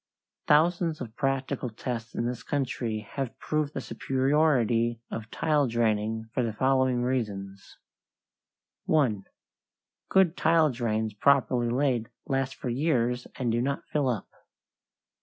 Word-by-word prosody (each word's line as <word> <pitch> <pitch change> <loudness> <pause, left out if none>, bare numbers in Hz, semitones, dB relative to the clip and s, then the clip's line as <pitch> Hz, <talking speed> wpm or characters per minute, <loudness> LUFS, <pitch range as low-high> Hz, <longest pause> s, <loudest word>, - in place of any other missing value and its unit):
Thousands 165 +1 +3
of 115 -3 -7
practical 135 -2 -1
tests 115 0 -5
in 120 - -1
this 120 -1 -3
country 120 -4 -2
have 135 -4 -4
proved 155 -1 -2
the - - -2
superiority 125 -2 +1
of 110 -1 -5
tile 150 -1 +1
draining 110 -1 0
for - - +1
the 115 -3 -1
following 130 0 +2
reasons: 100 -6 -3 1.1
1. 125 -11 +2 0.8
Good 185 -3 +4
tile 160 -2 +4
drains 110 -3 -1
properly 125 0 +3
laid 125 -2 0 0.2
last 135 -1 -1
for - - -6
years 125 -2 0
and 125 -3 -1
do 120 +1 +1
not 140 +2 -2
fill 145 -3 +1
up. 115 -6 -2
125 Hz, 125 wpm, -28 LUFS, 115-140 Hz, 1.1 s, Good